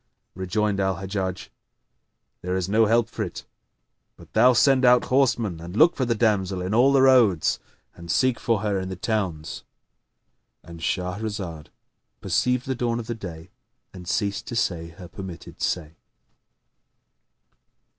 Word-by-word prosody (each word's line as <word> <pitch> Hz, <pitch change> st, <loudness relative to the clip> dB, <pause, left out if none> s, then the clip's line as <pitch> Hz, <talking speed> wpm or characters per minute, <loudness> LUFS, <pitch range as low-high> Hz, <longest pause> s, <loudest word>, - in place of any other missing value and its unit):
Rejoined 100 Hz, +2 st, -1 dB
Al 95 Hz, -1 st, +1 dB
Hajjaj, 95 Hz, -1 st, -4 dB, 0.9 s
"There 90 Hz, +1 st, -2 dB
is 95 Hz, -1 st, -1 dB
no 110 Hz, +2 st, +3 dB
help 115 Hz, +1 st, +3 dB
for 115 Hz, -, -7 dB
it 95 Hz, -5 st, -5 dB, 0.7 s
but -, -, -17 dB
thou 125 Hz, -, +6 dB
send 130 Hz, +2 st, +4 dB
out 125 Hz, -1 st, +6 dB
horsemen 115 Hz, -9 st, +2 dB
and 85 Hz, +3 st, -8 dB
look 165 Hz, +5 st, +6 dB
for 130 Hz, -, 0 dB
the 120 Hz, -1 st, 0 dB
damsel 100 Hz, -4 st, +1 dB
in 90 Hz, +3 st, -3 dB
all 125 Hz, +5 st, +5 dB
the 135 Hz, -1 st, +4 dB
roads, 120 Hz, -11 st, +4 dB, 0.3 s
and 85 Hz, 0 st, -12 dB
seek 130 Hz, +8 st, +2 dB
for 115 Hz, -4 st, 0 dB
her 105 Hz, -2 st, 0 dB
in 95 Hz, 0 st, -5 dB
the 95 Hz, -, -4 dB
towns."—And 85 Hz, -, -7 dB
Shahrazad 90 Hz, -2 st, -3 dB, 0.5 s
perceived 125 Hz, 0 st, 0 dB
the 130 Hz, -, -1 dB
dawn 120 Hz, -1 st, -1 dB
of 115 Hz, 0 st, -5 dB
day 85 Hz, -2 st, -9 dB, 0.4 s
and 90 Hz, -2 st, -11 dB
ceased 100 Hz, +2 st, -1 dB
to 120 Hz, -, -5 dB
say 85 Hz, -7 st, -1 dB
her 85 Hz, +2 st, -12 dB
permitted 95 Hz, -3 st, -9 dB
say. 80 Hz, -3 st, -2 dB
100 Hz, 145 wpm, -24 LUFS, 90-115 Hz, 0.9 s, thou